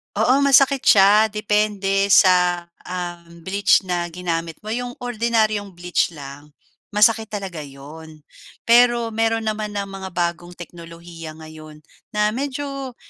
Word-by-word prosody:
Oo 260 +2 +3
masakit 275 0 +4
siya 210 0 +5
depende 210 -2 0
sa, 180 -3 +4 0.2
ah, 175 -1 -5 0.2
bleach 200 +3 +2
na 175 -2 -2
ginamit 165 -1 -4
mo 215 - -6
'yong 245 +1 -4
ordinaryong 220 -4 -1
bleach 175 0 0
lang 145 +1 -12 0.4
masakit 220 +1 +3
talaga 195 -5 -6
'yon. 150 +2 -12 0.4
Pero 235 -1 +3
meron 225 0 0
naman 215 -1 -4
ng 200 - -1
mga 195 -1 -8
bagong 175 0 -3
teknolohiya 170 -1 -11
ngayon 155 -1 -13 0.3
na 210 0 +2
medyo 275 0 -5
195 Hz, 125 wpm, -21 LUFS, 170-220 Hz, 0.4 s, siya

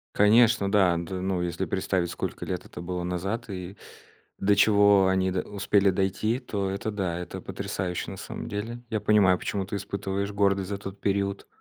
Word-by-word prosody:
Конечно, 110 0 +5
да. 95 -4 +4
Д 90 +2 -4
ну, 95 -1 -1
если 90 +2 -2
представить, 90 0 -1
сколько - - -4
лет - - -4
это - - -9
было 90 0 -3
назад 95 +7 -3
и 95 0 -6 0.6
до 100 +1 +3
чего 100 -1 +5
они 95 0 +2
до 90 - 0
успели 100 0 +2
дойти, 95 +5 0
то 100 -6 -3
это 100 +3 -3
да, 95 -5 -2
это 90 - -6
потрясающе 90 -2 -4
на - - -8
самом - - -7
деле. 115 +4 -4
Я 110 -2 -1
понимаю, 100 -4 +4
почему 100 -2 -2
ты 100 - -5
испытываешь 100 0 -3
гордость 100 -2 +1
за 100 - -2
тот 100 0 -8
период. 100 0 -1
100 Hz, 180 wpm, -27 LUFS, 95-105 Hz, 0.6 s, Конечно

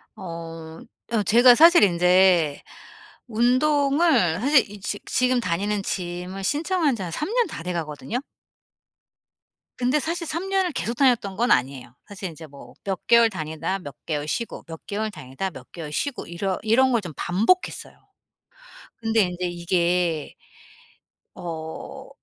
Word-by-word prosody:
어. 165 -2 -8 0.3
어 215 -3 +2
제가 240 +5 +7
사실 335 +1 +7
인제 180 -4 +4 0.7
운동을 275 - +2
사실 280 +3 +5
이 205 0 -10
지 205 +1 -3
지금 255 0 +1
다니는 200 +1 -1
짐을 180 +1 -4
신청한 305 - +1
지 215 - -7
한 175 - -5
3 300 - -3
년 485 -2 +2
다 165 - -7
돼가거든요. 170 +4 -4 1.6
근데 255 +4 +1
사실 335 +3 -3
3 335 +5 -3
년을 380 -2 +1
계속 235 -5 -3
다녔던 240 -7 +2
건 235 +5 +1
아니에요. 125 -1 0
사실 195 -2 -6
인제 160 0 -11
뭐 140 -1 -14
몇 195 -2 -4
개월 235 -1 +6
다니다 165 0 -4
몇 145 -6 -10
개월 150 -2 -3
쉬고 235 +8 -4
몇 165 -1 -10
개월 215 +2 -3
다니다 150 +3 -5
몇 130 -7 -13
개월 160 -4 -7
쉬고 275 - -3
이러 185 +2 -2
이런 255 +4 +3
걸 235 -3 +2
좀 175 -5 -8
반복했어요. 220 - 0 1.0
근데 225 -1 +1
인제 180 -1 -1
이게 175 -2 0 1.0
어 165 +10 -7
195 Hz, 255 characters per minute, -24 LUFS, 170-250 Hz, 1.6 s, 제가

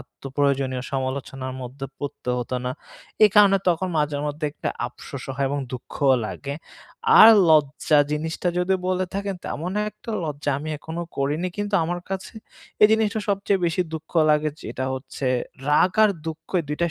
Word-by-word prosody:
আত্মপ্রয়োজনীয় 135 -2 -2
সমালোচনার 130 0 -3
মধ্যে 135 +2 -6
পড়তে 140 -3 -4
হত 120 - -5
না। 125 - -1 0.5
এই 210 - +6
কারণে 200 -2 +7
তখন 180 +2 +1
মাঝেমধ্যে 150 +1 -1
একটা - - -4 0.2
আফসোসও - - -8
হয় 140 0 +1
এবং 145 - -1
দুঃখও 135 +2 +1
লাগে, 140 +5 -5 0.6
আর 220 - +11 0.2
লজ্জা 150 0 +4
জিনিসটা 160 +3 -2
যদি 180 +2 +2
বলে 185 0 +1
থাকেন 200 0 -2
তেমন 175 +5 -4 0.2
একটা 230 - -10
লজ্জা 145 -1 -2
আমি 155 +2 -6
এখনো 160 +3 -5
করিনি। 150 +6 0
কিন্তু 205 0 -2
আমার 175 +2 -2
কাছে 195 +3 -5 0.5
এই - - +11
জিনিসটা 220 0 +1
সবচেয়ে 200 0 +1
বেশি 165 +2 0
দুঃখ 160 0 -7 0.2
লাগে. 150 0 +3
যেটা 130 - -4
হচ্ছে 130 +1 -6 0.4
রাগ 165 +5 +4
আর 215 - +5 0.2
দুঃখ 160 0 -6
এই - - -7
২ 150 - -2
টাই 170 0 +2
150 Hz, 160 wpm, -23 LUFS, 140-185 Hz, 0.6 s, আর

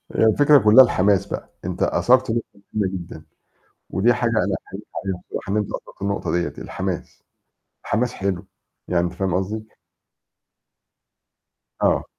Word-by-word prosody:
هي - - +4
الفكرة 145 +6 +6
كلها 110 +2 +8
الحماس 100 -4 +2
بقى، - - -6 0.2
أنت - - -2
أثرت 130 -1 +3
نقطة 120 - +1 0.3
مهمة 105 -3 +1
جدًا 85 -3 -7 0.6
ودي 110 +6 +3
حاجة 120 0 0
أنا 110 -2 +1
أحييك - - -8 0.2
عليها 95 -2 -3
بصراحة، 95 - -5
إن 105 - +1
أنت 105 - 0
أثرت - - -8
النقطة 100 0 -1
ديّة، 85 -4 -2
الحماس، - - -5 0.6
الحماس 125 +3 0
حلو، 95 -1 -3 0.4
يعني 85 -1 +2
أنت 85 - -2
فاهم 95 -2 -1
قصدي. 110 +4 -2 2.1
آه. - - +2
100 Hz, 145 wpm, -22 LUFS, 95-115 Hz, 2.1 s, كلها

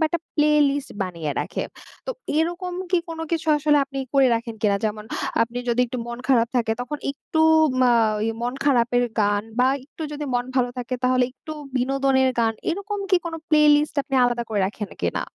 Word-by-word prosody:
বা 315 - +4
একটা 340 0 -2
play 300 0 +3 0.2
list 280 0 -3
বানিয়ে 170 -5 -4
রাখে। - - -3 0.4
তো - - -2 0.3
এরকম 350 +3 -1 0.2
কি 360 - +4
কোনো 325 -1 -5
কিছু 325 -1 -1
আসলে 295 0 +3
আপনি 275 0 -7 0.2
করে 270 -1 +6
রাখেন 230 0 -3
কিনা 200 -2 +3
যেমন 210 0 -2 0.4
আপনি 235 +2 -3
যদি 235 +1 +2
একটু 245 +1 -5
মন 240 0 -6
খারাপ 235 -3 +4
থাকে 225 -2 +1
তখন 270 +4 -4
একটু 315 +3 -3 0.4
মা 250 -1 +5 0.5
মন 245 +2 -1
খারাপের 245 -3 +3 0.2
গান 205 0 +2 0.2
বা 250 - +5 0.2
একটু 305 - -10
যদি 295 0 -4
মন 245 - +1
ভালো 250 -2 +2
থাকে 250 +1 -3
তাহলে 255 0 +3
একটু 310 +4 -9 0.2
বিনোদনের 265 +1 +2
গান 225 -1 +2 0.2
এরকম 405 +3 -3
কি 370 - +6
কোনো 330 -1 -4
প্লে 305 -1 +4 0.2
লিস্ট 300 +1 -1
আপনি 270 - -5
আলাদা 240 -1 0
করে 210 -2 0
রাখেন 210 +1 -6
কিনা? - - 0
255 Hz, 190 wpm, -23 LUFS, 235-300 Hz, 0.5 s, করে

